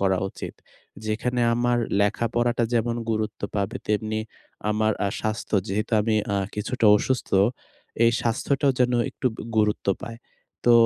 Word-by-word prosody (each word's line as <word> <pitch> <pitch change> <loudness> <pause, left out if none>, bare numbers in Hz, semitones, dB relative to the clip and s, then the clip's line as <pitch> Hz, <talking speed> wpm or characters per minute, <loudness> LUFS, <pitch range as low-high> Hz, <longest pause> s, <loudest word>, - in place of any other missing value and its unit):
করা 95 -2 +2
উচিত। - - -7 0.5
যেখানে 120 +3 -1
আমার 120 0 +2 0.2
লেখাপড়াটা 115 +3 +1
যেমন 120 +1 +1
গুরুত্ব 110 -1 -2 0.2
পাবে, 100 +1 -1
তেমনি 110 +1 0 0.5
আমার 110 0 +2
আ - - +1
স্বাস্থ্য। 110 0 -2
যেহেতু 105 +4 -2
আমি 110 +1 +1 0.2
আ - - +2 0.2
কিছুটা 110 +2 0
অসুস্থ, 130 +4 -1 0.7
এই 115 - +6
স্বাস্থ্যটাও 135 +4 +1
যেন 125 0 +4 0.2
একটু - - -3
ব - - -15 0.2
গুরুত্ব 105 -2 +1
পায়। 115 0 -7 0.5
তো 120 - +7
110 Hz, 140 wpm, -25 LUFS, 105-120 Hz, 0.7 s, তো